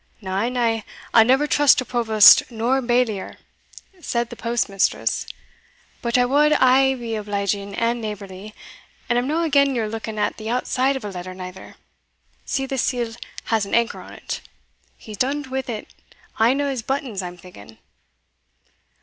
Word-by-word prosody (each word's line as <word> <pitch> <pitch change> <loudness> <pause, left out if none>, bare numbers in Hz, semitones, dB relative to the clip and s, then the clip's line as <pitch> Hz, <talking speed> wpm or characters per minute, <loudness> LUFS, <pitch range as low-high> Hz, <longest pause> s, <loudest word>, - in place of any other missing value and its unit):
"Na, 195 +3 -2
na, 235 -3 0 0.3
I'll 225 - +8
neither 265 +5 +3
trust 290 -1 +4
to 255 - -1
provost 220 -4 +6
nor 240 +3 0
bailier" 240 -5 0 0.6
said 235 -5 -2
the - - -7
postmistress, 230 -5 -1 0.7
"but 235 +1 +1
I 250 - +4
wad 295 +4 +3
aye 265 0 +4
be 235 -3 -5
obliging 200 -1 -2
and 235 +1 0
neighbourly, 205 -1 -7 0.5
and 240 0 +2
I'm 245 - -2
no 320 +3 0
again 280 -4 +3
your 225 -3 -1
looking 220 0 -6
at 210 - -1
the 220 0 -6
outside 255 +2 0
of 260 -5 -5
a 205 - -5
letter 185 0 -7
neither 185 0 -9 0.7
See, 270 - -1
the 270 -1 -3
seal 240 -2 -1 0.3
has 225 -2 0
an - - -1
anchor 235 0 0
on't - - -7 0.6
he's 215 -2 -10
done't 275 +2 -1
wi' 255 -5 -4 0.5
ane 245 +6 +3
o' 285 - 0
his 265 -4 -2
buttons, 255 -5 -3
I'm 180 -1 -7
thinking." 110 - -14
235 Hz, 155 wpm, -22 LUFS, 210-260 Hz, 0.7 s, I'll